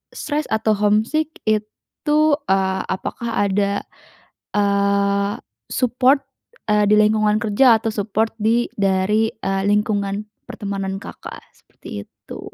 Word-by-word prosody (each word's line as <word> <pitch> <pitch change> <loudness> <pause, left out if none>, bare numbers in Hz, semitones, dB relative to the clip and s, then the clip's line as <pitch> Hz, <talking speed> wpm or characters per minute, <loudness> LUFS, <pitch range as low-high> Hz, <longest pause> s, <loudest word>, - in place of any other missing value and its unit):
stres 300 0 -3
atau 220 0 +1
homesick 215 +10 +1 0.2
itu, 215 +8 -1 0.3
eee, 190 0 +1
apakah 215 +2 -2
ada, 200 +1 0 0.7
eee, 200 0 +1 0.4
support, 255 +3 +2 0.5
eee, 210 -1 +3
di 210 - +5
lingkungan 215 0 +3
kerja 230 +2 +5
atau 225 0 -1
support 215 +1 -1
di 230 +3 +2
dari, 195 +3 +1
eee, 195 -3 -2
lingkungan 205 0 0 0.2
pertemanan 195 -1 -4
Kakak, - - -9
seperti 100 0 -10
itu. - - -11
210 Hz, 110 wpm, -20 LUFS, 200-225 Hz, 0.7 s, di